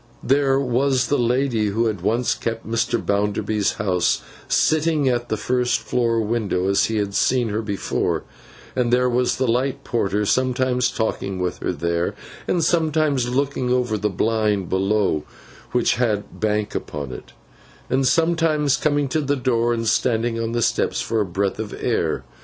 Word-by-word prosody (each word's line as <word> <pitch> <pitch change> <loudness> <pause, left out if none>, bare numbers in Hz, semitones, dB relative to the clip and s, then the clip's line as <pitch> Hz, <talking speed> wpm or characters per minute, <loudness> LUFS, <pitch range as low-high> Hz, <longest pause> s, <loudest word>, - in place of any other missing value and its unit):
There 135 0 +3
was 130 -1 +1
the 145 - +2
lady 120 -2 +1
who 110 +3 0
had 105 -5 -1
once 115 +6 +1
kept 115 -1 -4
Mr. 115 +1 0
Bounderby's 105 0 0
house, 90 -4 0 0.2
sitting 155 -2 +2
at 120 -1 0
the 110 - 0
first 125 +2 0
floor 115 -2 0
window 105 -4 -1
as 100 0 +3
he 110 - -2
had 100 -2 -1
seen 125 +2 +2
her 105 +2 -1
before; 100 -3 -2 0.5
and 125 -2 +1
there 125 +1 +3
was 125 0 +1
the 130 - 0
light 125 +3 0
porter, 105 -2 0
sometimes 130 +1 +1
talking 110 -5 -2
with 90 -1 -2
her - - -1
there, 85 0 -1 0.3
and 175 -2 +1
sometimes 155 -6 +1
looking 130 -1 -1
over 125 -3 +1
the 105 0 0
blind 105 -2 0
below 95 -4 +1 0.5
which 125 -2 +2
had 110 -5 -1
BANK 105 -1 0
upon 70 -3 -5
it, 60 - -10 0.5
and 130 +1 +1
sometimes 160 -4 +2
coming 145 -2 +1
to 155 +4 0
the 145 0 0
door 120 -3 +1
and 115 -1 -1
standing 115 0 +1
on 115 0 -2
the 120 -1 +1
steps - - 0
for 115 -1 0
a - - 0
breath 95 +3 -1
of 110 -2 -5
air. - - 0
120 Hz, 165 wpm, -22 LUFS, 105-130 Hz, 0.5 s, There